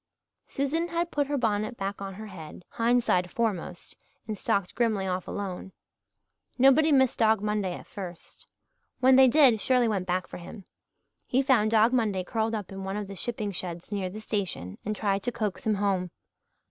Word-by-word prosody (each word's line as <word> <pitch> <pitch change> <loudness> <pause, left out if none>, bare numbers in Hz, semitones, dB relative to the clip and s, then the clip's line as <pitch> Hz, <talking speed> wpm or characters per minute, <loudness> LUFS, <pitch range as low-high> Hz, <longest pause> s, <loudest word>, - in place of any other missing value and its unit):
Susan 305 +5 -1
had 340 0 -2
put 290 -1 0
her 290 0 -1
bonnet 220 -1 -1
back 195 +1 -4
on 195 -1 -5
her 215 +3 -8
head, 180 -3 -10
hindside 230 -6 +2
foremost, 185 -5 -3 0.3
and 215 - -3
stalked 200 -1 -1
grimly 220 -5 0
off 185 -1 -2
alone. 190 -1 -5 0.8
Nobody 270 +5 +5
missed 265 -3 +3
Dog 220 -1 +4
Monday 210 -3 -1
at - - -10
first. 180 -4 -10 0.5
When 260 +1 +6
they 265 0 +8
did 255 -5 +5
Shirley 250 -2 +3
went 195 -4 -1
back 180 0 0
for - - -9
him. 180 +3 -10 0.6
He 265 +2 +2
found 245 -6 +3
Dog 225 +2 +4
Monday 210 -7 +1
curled 220 +3 -1
up 205 -4 -5
in 195 0 -6
one 195 +1 -3
of 210 -1 -4
the 195 - -8
shipping 215 0 -2
sheds 175 -1 -6
near 195 -3 -2
the 215 +4 -8
station 190 - -4
and 210 +1 -2
tried 200 -2 0
to 245 - -2
coax 215 -2 -3
him 215 - +3
home. 195 -3 0
210 Hz, 185 wpm, -27 LUFS, 190-240 Hz, 0.8 s, they